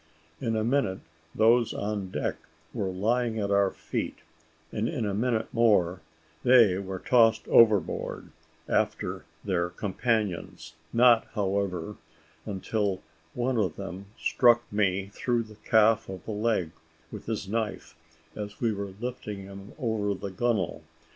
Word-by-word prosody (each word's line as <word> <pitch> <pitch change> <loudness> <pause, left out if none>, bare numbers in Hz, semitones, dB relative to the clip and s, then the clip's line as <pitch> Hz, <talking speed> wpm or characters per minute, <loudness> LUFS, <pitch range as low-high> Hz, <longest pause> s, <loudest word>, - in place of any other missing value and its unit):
In 115 -3 -1
a 110 - 0
minute, 115 -6 0 0.3
those 115 +1 +4
on 100 -2 -3
deck - - -2 0.4
were 95 - -2
lying 110 +5 0
at 100 -2 -1
our 100 -1 +4
feet, - - -4 0.5
and 110 +1 -1
in 130 -9 -2
a 100 - -1
minute 115 +1 -1
more, 100 -6 +3 0.4
they 115 -7 +6
were 95 -1 -5
tossed 115 +1 +3
overboard 110 -6 +3 0.4
after - - -1 0.2
their 90 -3 0
companions; 95 -4 -2 0.2
not, 120 -1 +5
however, 100 -2 -1 0.5
until 100 -1 -2 0.3
one 125 0 0
of 90 -7 0
them 95 0 -7
struck 120 -2 +4
me 100 -1 +1
through 120 0 0
the 110 -1 -14
calf 110 -1 +4
of 95 -3 -8
the - - -4
leg 105 -6 0 0.4
with - - -9
his 110 -3 -3
knife, 110 +1 -3 0.4
as 105 -1 -6
we 115 -2 +1
were 100 -1 -5
lifting 110 -5 -5
him 100 +1 -10
over 110 -7 -1
the 100 +1 -6
gunwale. 105 -2 -1
105 Hz, 135 wpm, -28 LUFS, 95-115 Hz, 0.5 s, they